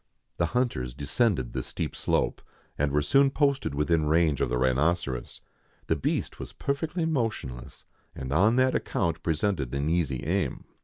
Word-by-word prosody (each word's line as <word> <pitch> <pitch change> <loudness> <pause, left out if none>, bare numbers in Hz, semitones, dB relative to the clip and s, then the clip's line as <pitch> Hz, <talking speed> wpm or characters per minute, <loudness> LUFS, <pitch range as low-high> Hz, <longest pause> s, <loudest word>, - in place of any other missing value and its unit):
The 85 - +2
hunters 65 - -1
descended 75 - 0
the - - -1
steep - - -4
slope, - - 0 0.3
and 70 0 0
were 75 +1 +2
soon 135 - +4
posted 140 - +1
within 75 +1 +1
range 80 -2 +3
of - - +1
the 60 - 0
rhinoceros. 65 0 0 0.4
The 80 - +1
beast 75 - -2
was - - -7
perfectly 160 +4 -2
motionless, 110 - -3 0.3
and 65 +1 -4
on 105 +9 +4
that 130 0 +3
account 85 -1 -1
presented 80 -5 -1
an 70 +2 0
easy 70 -7 0
aim. 95 +5 -1
80 Hz, 155 wpm, -27 LUFS, 70-115 Hz, 0.4 s, soon